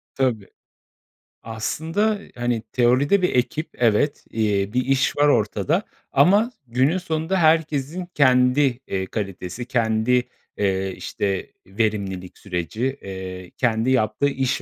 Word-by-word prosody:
Tabii. 120 -7 0 1.0
Aslında, 165 - -1 0.2
hani, 120 -1 -1
teoride 130 +10 +3
bir 180 - +2
ekip 150 +6 0
evet, 120 +5 +2
eee, 105 -2 0
bir 125 0 +1
iş 135 0 +1
var 145 0 +4
ortada 120 - +1 0.3
ama 200 - +4 0.2
günün 130 +9 +2
sonunda 165 0 -1
herkesin 160 0 +1
kendi, 130 -1 +3
eee, 95 -1 -2
kalitesi, 95 +2 -5
kendi, 115 +1 +1 0.3
eee, 95 -1 0
işte, 100 -2 -3 0.2
verimlilik 95 -3 -2
süreci, 105 - -3
eee, 95 -1 -7
kendi 115 0 +1
yaptığı 110 +2 +2
iş 135 -1 -1
125 Hz, 115 wpm, -22 LUFS, 105-145 Hz, 1.0 s, var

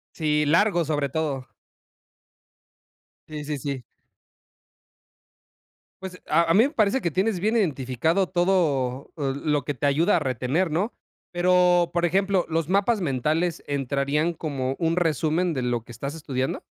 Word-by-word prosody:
Sí, 150 -2 +1
largo 175 +3 +3
sobre 145 -2 -1
todo. 140 -4 -3 1.8
Sí, 150 -1 -6
sí, 150 -1 -3
sí. 135 -2 -4 2.2
Pues, 185 -1 -8
a 165 +2 +4
a - - +5
mí 220 +5 +6
me - - -6
parece 235 -1 +1
que 170 - 0
tienes 190 +3 0
bien 220 +5 +1
identificado 160 - 0
todo 160 -8 0
l 135 -2 -2 0.2
lo 145 -4 0
que 145 - -2
te 145 +2 -1
ayuda 165 +7 +3
a - - +2
retener, 135 +6 -1
¿no? 185 +10 -1 0.4
Pero, 180 0 +3
por 175 0 +1
ejemplo, 190 +1 +1
¿los 165 0 -1
mapas 200 +2 +2
mentales 155 +4 -1
entrarían 140 +4 0
como 135 -5 -3
un 165 0 +1
resumen 165 +1 +1
de 130 -4 -2
lo 120 -1 -1
que 120 - -13
estás 140 +5 -5
estudiando? 130 -4 -3
160 Hz, 145 wpm, -24 LUFS, 140-180 Hz, 2.2 s, mí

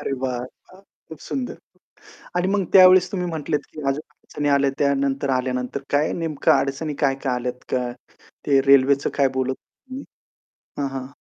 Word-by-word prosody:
अरे - - -3
वाह! 125 -2 -1
वाह! 130 +9 -12 0.3
खूप 160 - -10
सुंदर. 260 -2 -4 0.8
आणि 180 +1 +1
मग 195 -1 +1
त्यावेळेस 185 -1 +7
तुम्ही 180 -3 -2
म्हंटलेत, 160 -2 -2
की 155 - -8
अजून 135 +2 0
अडचणी 145 -1 -4
आल्या 140 0 +3
त्यानंतर 140 0 0
आल्यानंतर. 125 +1 -2
काय 145 +2 +1
नेमकं 160 -4 0
अडचणी 140 +3 0
काय-काय 135 -1 0
आल्यात 125 0 -4
काय, 125 -1 -1 0.5
ते 135 -2 +4
रेल्वेचं 140 +1 +4
काय 140 -2 +3
बोलत 130 0 -1
होतं 130 - -5 0.3
तुम्ही? 265 +2 -7 0.8
हां, 140 -1 -1
हां. 135 -1 -5
140 Hz, 160 wpm, -22 LUFS, 130-160 Hz, 0.8 s, त्यावेळेस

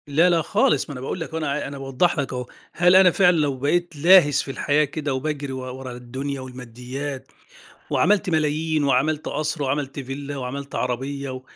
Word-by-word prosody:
لأ 160 +5 +4
لأ 170 -2 +3
خالص، 150 -2 +1
ما - - -5
أنا 125 - -7
باقول 135 +7 -4
لك 165 - -5
أهو، 160 - -5
أنا 150 -2 -2
أنا 140 +1 -7
باوضِّح 135 +5 0
لك 135 -1 -2
أهو، 125 0 -3 0.3
هل 180 +1 +4
أنا 185 -1 +7
فعلًا 180 -1 +4
لو 145 -3 0
بقيت 170 +5 0
لاهِس 150 -2 +6
في 135 - -6
الحياة 145 +2 +1
كده 150 -1 -3
وباجري 140 +1 -3
و 130 - -5 0.2
ورا 130 -1 -7
الدنيا 130 +3 -5
والماديات، 130 +2 -7 0.6
وعمِلت 205 +1 +2
ملايين 155 -1 0
وعمِلت 140 +3 +1
قصر، 155 0 -2
وعمِلت 140 +1 -2
villa 140 +2 -6
وعمِلت 140 +1 -6
عربية 130 +1 -3
140 Hz, 180 wpm, -23 LUFS, 135-155 Hz, 0.6 s, أنا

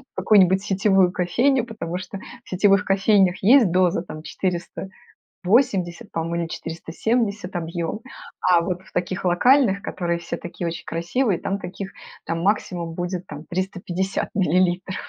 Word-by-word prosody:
какую-нибудь 190 -1 +4
сетевую 195 -2 +3
кофейню, 240 +9 +2
потому 215 -7 -5
что 185 +2 -7 0.2
в - - -18
сетевых 195 +2 +3
кофейнях 195 -1 +3
есть 230 -2 +6
доза 180 0 +2
там, 155 -3 -9
480, 185 +2 -2
по-моему, 165 +1 -2
или - - -4
470 200 +5 -2
объём. 170 +4 -3 0.4
А 180 -2 +4
вот 180 +1 -3
в - - -19
таких 180 +2 -2
локальных, 200 +3 +4
которые 170 -3 -2
все 170 0 -5
такие 175 0 -5
очень 165 - -5
красивые, 175 +4 0
там 195 - -2
таких 190 0 -7 0.3
там 165 0 -2
максимум 180 -4 -1
будет, 180 +1 -4
там, 150 +2 -9
350 185 +1 -2
миллилитров. 185 0 +1
185 Hz, 135 wpm, -23 LUFS, 175-200 Hz, 0.4 s, есть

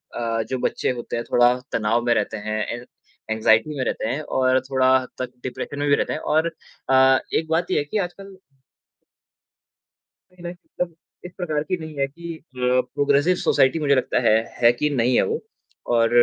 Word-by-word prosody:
अ, 115 -1 -1
जो 130 - -1
बच्चे - - -1
होते 120 -1 -5
हैं 115 - -2
थोड़ा 120 0 +5 0.2
तनाव 115 +2 +1
में 120 - +4
रहते 110 - -1
हैं। 110 +1 -2
एन 120 +1 -7 0.5
एंग्जायटी 110 +6 +3
में 130 - 0
रहते - - -2
हैं 145 +6 -2 0.2
और 130 0 +3
थोड़ा 130 -1 +2 0.3
तक 125 -1 -3
डिप्रेशन 135 +2 -5
में 145 - 0
भी 140 - +6
रहते - - -1
हैं - - -3
और 160 +1 +1 0.4
अ, 130 0 +6
एक 160 - +1
बात 165 +2 0
ये - - +2
है - - 0
कि 145 - -3
आजकल 195 0 -5 1.9
नहीं, 180 -1 -17
नहीं 175 +1 -5
मतलब 175 -1 -6 0.3
इस 180 - -7
प्रकार 155 -5 -1
की 185 +3 -2
नहीं 160 -2 -8
है 135 - +2
कि 170 +3 -8
अ, 125 -4 0
प्रोग्रेसिव 145 +5 +3
सोसाइटी 135 +3 +3
मुझे 140 -2 +3
लगता 130 - +1
है - - +6 0.3
है 120 0 +7
कि 150 +5 0
नहीं 125 -3 +1
है - - +5
वो 455 +1 -2 0.5
और 115 0 +4
135 Hz, 190 wpm, -23 LUFS, 120-160 Hz, 1.9 s, है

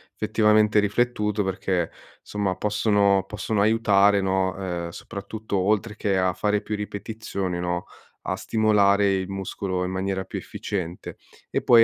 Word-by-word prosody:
effettivamente 105 -1 +3
riflettuto 105 0 +1
perché 95 -2 -1 0.3
somma, 100 -3 -2
possono 100 -2 +2
possono 105 0 -1
aiutare, 105 -2 +4
no, 95 0 +1
uhm 90 -3 -4
soprattutto 100 +4 -5
oltre 105 +3 +1
che 100 -2 0
a 95 -1 +2
fare 105 +2 0
più 105 0 -3
ripetizioni, 100 -3 -4
no, 90 0 -2 0.4
a - - -1
stimolare 100 -2 +3
il 95 -1 -1
muscolo 95 -1 -3
in 90 - -2
maniera 95 0 -2
più - - -6
efficiente, 90 -3 -5 0.3
e - - -1
poi 115 -1 +7
100 Hz, 135 wpm, -24 LUFS, 95-105 Hz, 0.4 s, poi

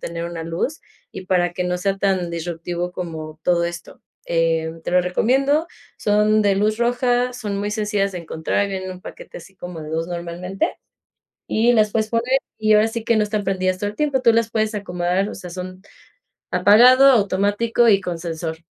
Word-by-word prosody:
tener 170 0 -5
una 170 -1 -6
luz 170 - -3 0.3
y 190 - -8
para 175 -1 +1
que 180 - -2
no 180 0 -1
sea 195 +2 0
tan 190 -3 0
disruptivo 175 +1 -4
como 160 -3 -7
todo 175 -1 +2
esto, 175 0 -7 0.2
eh, 165 -1 +1
te - - -3
lo 180 +1 +4
recomiendo, 270 - +1 0.3
son 210 +1 +2
de 200 -1 +2
luz 215 +2 +1
roja, 245 +1 +1
son 210 -5 -4
muy 205 +1 -2
sencillas 210 -2 -1
de 180 - -5
encontrar 170 +4 -2
en 185 -1 -4
un 185 -1 -9
paquete - - -10
así 190 +2 -16
como 180 -2 -8
de 155 - -8
2 160 +1 -2
normalmente, 175 +2 -3 0.7
y 235 +2 +3
las 215 -2 +3
puedes 220 0 0
poner 240 +3 +1 0.2
y 215 0 +1
ahora 215 +1 +5
sí 225 0 -5
que 230 0 +2
no 210 - +3
están 210 -1 -2
prendidas 185 -1 -1
todo 205 - -1
el 210 - -11
tiempo. 285 -4 +1
Tú 235 -2 +5
las 225 0 +1
puedes 220 -1 -1
acomodar, 180 -1 -1
o - - -7
sea, 180 -2 -9
son 185 +1 -7 0.7
apagado, 250 +6 +6
automático 205 +2 +2
y 200 -3 +5
con 175 -2 -4
sensor. 160 -1 -5
195 Hz, 190 wpm, -21 LUFS, 175-220 Hz, 0.7 s, apagado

